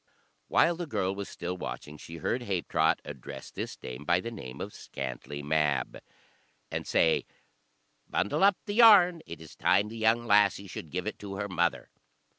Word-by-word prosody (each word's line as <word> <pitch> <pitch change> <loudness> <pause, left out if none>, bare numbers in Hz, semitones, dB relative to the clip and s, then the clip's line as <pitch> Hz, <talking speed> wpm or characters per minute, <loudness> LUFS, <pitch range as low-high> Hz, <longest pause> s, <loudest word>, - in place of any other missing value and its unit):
While 170 0 +3
the 175 -1 -4
girl 95 -9 -1
was 100 0 -6
still 90 +1 -5
watching, 75 -3 -6
she 85 - -9
heard 115 - -1
Habetrot 95 -7 +1
address - - -9
this - - -5
dame 65 +3 -8
by 85 +3 +3
the 115 +5 -5
name 65 - -8
of - - -6
Scantlie 70 +2 -6
Mab, 75 -1 0 0.7
and - - -4
say, 80 -1 +2 0.8
"Bundle 100 - 0
up 200 -1 +5
the 205 - -3
yarn, 200 -7 +7
it 85 - -8
is 80 -1 -12
time 105 +1 +2
the 115 - -8
young 110 +2 +3
lassie 100 -2 +4
should 85 -4 -8
give 90 +3 -3
it 110 - -4
to 100 -1 -7
her 100 +1 -3
mother." 85 -2 -1
95 Hz, 175 wpm, -29 LUFS, 80-115 Hz, 0.8 s, yarn